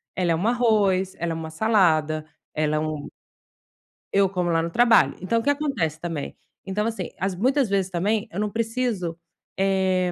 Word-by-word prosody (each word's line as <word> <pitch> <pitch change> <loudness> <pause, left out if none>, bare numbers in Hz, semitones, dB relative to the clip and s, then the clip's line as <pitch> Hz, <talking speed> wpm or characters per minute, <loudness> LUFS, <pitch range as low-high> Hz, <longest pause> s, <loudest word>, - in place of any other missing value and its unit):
ela 180 -2 +1
é - - +3
um 180 +7 -1
arroz, 210 -6 +2
ela 170 0 -1
é - - -2
uma 160 0 -5
salada, 160 -5 +2 0.3
ela 155 0 0
é - - +1
um 155 -1 -3 1.1
Eu 195 -1 +4
como 180 -2 -1
lá 165 -1 +2
no 170 - -2
trabalho. 235 +5 +4
Então, 230 +5 +1
o 225 - -4
que 285 - +1
acontece 270 - -1
também? 165 -4 -5 0.3
Então, 200 +2 -1
assim, 225 -5 -3
às 190 0 -1
muitas 260 +5 +2
vezes 195 -1 +1
também 205 +5 0
eu 190 - -4
não 210 0 0
preciso, 225 -7 -2 0.4
eh, 190 -2 +1
190 Hz, 185 wpm, -24 LUFS, 165-220 Hz, 1.1 s, Eu